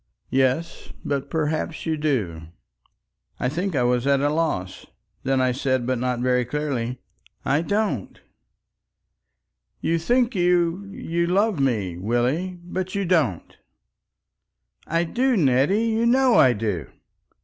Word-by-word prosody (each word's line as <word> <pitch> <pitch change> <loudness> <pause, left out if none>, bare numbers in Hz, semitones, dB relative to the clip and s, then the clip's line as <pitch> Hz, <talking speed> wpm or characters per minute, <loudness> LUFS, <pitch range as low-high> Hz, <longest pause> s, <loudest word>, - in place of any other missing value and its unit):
"Yes. 135 +6 0
But 140 -1 -2
perhaps 160 0 -2
you 160 -1 0
do." 105 - -2 0.9
I - - 0
think 175 +4 -2
I 125 - +2
was 125 +1 +1
at 140 -1 +4
a 145 +1 +1
loss; 150 - -2 0.3
then 135 0 +1
I 130 -1 +2
said, 130 -1 0
not 125 -1 -1
very 125 0 +2
clearly, 125 -2 -3 0.5
"I 145 +3 +2
don't." 200 - -2 1.6
"You 165 0 0
think 245 +7 +2
you—you 175 -1 0
love 200 0 +1
me, 105 -10 0
Willie. 125 - -1
But 185 +2 -4
you 200 -1 0
don't." 155 - 0 1.3
"I 165 +2 +1
do. 245 +8 +1
Nettie! 145 - +3
You 225 +1 +1
know 255 +1 +4
I 130 - +6
do." 100 - -3
150 Hz, 125 wpm, -23 LUFS, 125-180 Hz, 1.6 s, I